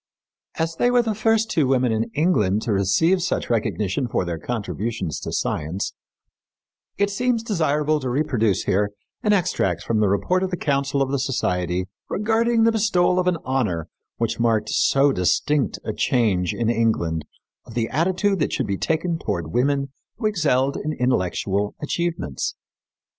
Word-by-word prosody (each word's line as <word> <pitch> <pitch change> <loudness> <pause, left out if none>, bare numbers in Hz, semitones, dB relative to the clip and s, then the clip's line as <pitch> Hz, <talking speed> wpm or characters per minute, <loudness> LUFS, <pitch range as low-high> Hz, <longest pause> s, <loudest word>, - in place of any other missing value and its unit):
As 165 0 -1
they 245 - +3
were 245 -1 +4
the 225 -2 -1
first 225 +1 +1
two 150 -5 +2
women 130 -2 +2
in 110 +1 +1
England 110 - +2
to 110 - 0
receive 100 - +2
such 170 - -1
recognition 110 +1 0
for 100 - -1
their 85 -2 -3
contributions 110 - -3
to - - -5
science, 95 +6 -2 1.0
it 200 0 +1
seems 240 +2 0
desirable 155 -7 +1
to 130 -3 -3
reproduce 120 -7 +1
here 100 +2 +1 0.3
an 210 - +2
extract 170 - +1
from 110 -2 0
the 105 - +3
report 100 - +1
of 190 - 0
the 180 - -3
council 140 -2 0
of 135 - -4
the 140 - 0
society 90 -9 -1 0.2
regarding 225 +2 +2
the 230 - +5
bestowal 185 -5 +2
of 180 - 0
an 180 -2 +2
honor 110 -12 -1 0.3
which 115 -1 -1
marked 110 -2 +1
so 140 +1 +3
distinct 135 +8 +1
a - - -2
change 100 - +1
in 115 - -2
England 110 -9 +1 0.4
of 115 - -11
the 115 -2 0
attitude 185 +6 +1
that 150 - 0
should - - -1
be 100 -1 -2
taken 165 +1 0
toward 85 - -3
women 140 +2 +1 0.3
who 225 - -4
excelled 145 -10 +1
in 155 +1 -3
intellectual 100 - 0
achievements. 160 - -2
135 Hz, 165 wpm, -23 LUFS, -, 1.0 s, the